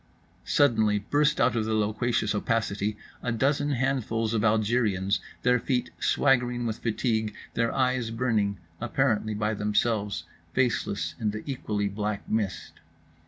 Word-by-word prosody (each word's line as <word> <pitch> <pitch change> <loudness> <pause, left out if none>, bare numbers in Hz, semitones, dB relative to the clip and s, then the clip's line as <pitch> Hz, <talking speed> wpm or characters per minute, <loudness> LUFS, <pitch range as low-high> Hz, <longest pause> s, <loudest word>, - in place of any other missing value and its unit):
Suddenly 110 -7 +3
burst 145 +8 +1
out 120 0 +3
of 110 -2 0
the 110 0 0
loquacious 110 +1 0
opacity 105 -1 -1 0.2
a 125 - -1
dozen 140 +5 +1
handfuls 115 -4 0
of 110 - +1
Algériens, 105 -3 +2 0.2
their 125 0 +4
feet 125 -1 -1
swaggering 125 -3 +2
with 110 -2 -2
fatigue, 110 -2 -1 0.2
their 115 0 +1
eyes 125 -3 +1
burning, 115 -4 0 0.2
apparently 110 -3 0
by 105 +1 0
themselves—faceless 105 -2 -1
in 110 - 0
the 105 +1 -5
equally 105 -7 -2
black 105 +1 -3
mist. 105 -4 -2
110 Hz, 125 wpm, -27 LUFS, 105-125 Hz, 0.2 s, their